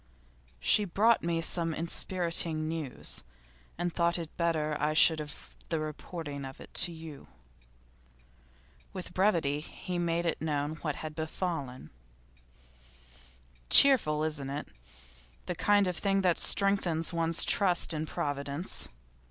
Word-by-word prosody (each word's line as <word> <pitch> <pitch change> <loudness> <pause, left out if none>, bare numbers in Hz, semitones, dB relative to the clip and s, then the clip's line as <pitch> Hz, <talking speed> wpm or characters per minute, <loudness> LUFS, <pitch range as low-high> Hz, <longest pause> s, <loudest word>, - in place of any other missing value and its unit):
'She 210 - +3
brought 210 +5 +2
me 165 -1 -1
some 165 -1 +2
enspiriting 165 -2 0
news, 155 -6 -3 0.6
and 175 0 -2
thought 170 0 +1
it 165 -2 -8
better 155 -3 -1
I 155 +1 0
should 160 0 +6
have 150 -1 -8
the 165 - -1
reporting 155 -1 -6
of 135 0 -9
it - - -13
to 175 - +4
you.' 160 -3 -10 1.7
With 180 -1 -7
brevity 170 -7 +1
he 175 +3 -6
made 170 0 -1 0.2
known 150 0 -2
what 150 -2 -3
had 155 -1 -7
befallen. 155 - -5 1.8
'Cheerful, 175 - +7
isn't 150 -3 -3
it? 145 +2 -5 0.8
The 180 - -3
kind 205 +3 +2
of 180 -2 -2
thing 195 -1 +1
that 180 -3 +1
strengthens 180 -5 0
one's 165 0 +1
trust 180 -4 +3
in 155 0 -3
Providence. 145 +4 -4
165 Hz, 125 wpm, -30 LUFS, 150-175 Hz, 1.8 s, Cheerful